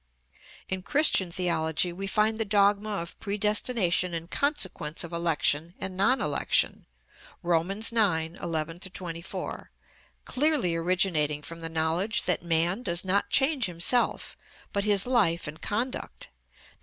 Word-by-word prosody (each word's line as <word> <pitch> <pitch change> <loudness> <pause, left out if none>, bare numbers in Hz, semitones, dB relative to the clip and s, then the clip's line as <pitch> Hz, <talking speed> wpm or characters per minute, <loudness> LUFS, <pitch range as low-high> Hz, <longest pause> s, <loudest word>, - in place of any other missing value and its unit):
In 190 -1 -4
Christian 280 - +3
theology 170 -1 0
we 195 +3 -5
find 215 +3 +1
the - - +2
dogma 205 0 +2
of 170 -5 -5
predestination 205 -3 0
in 165 +1 -6
consequence 190 - -1
of 170 0 -8
election 165 0 0
and 190 -1 -5
non 200 +8 +2
election - - 0 0.6
(Rom. 170 0 +1
ix. 215 +4 +2
11 165 -5 -1
24), 180 -2 -6 0.6
clearly 285 - +1
originating 165 -4 +1
from 165 +2 -9
the 165 - -4
knowledge 165 +6 -1
that 180 - 0
man 170 +5 +1
does 175 -5 +1
not 195 +2 +1
change 270 -2 +2
himself, 180 +7 0 0.4
but 200 0 0
his 205 -2 +4
life 205 -11 +1
and 155 +2 -8
conduct, 255 - -4
_i. - - -29
185 Hz, 130 wpm, -27 LUFS, 165-210 Hz, 0.6 s, his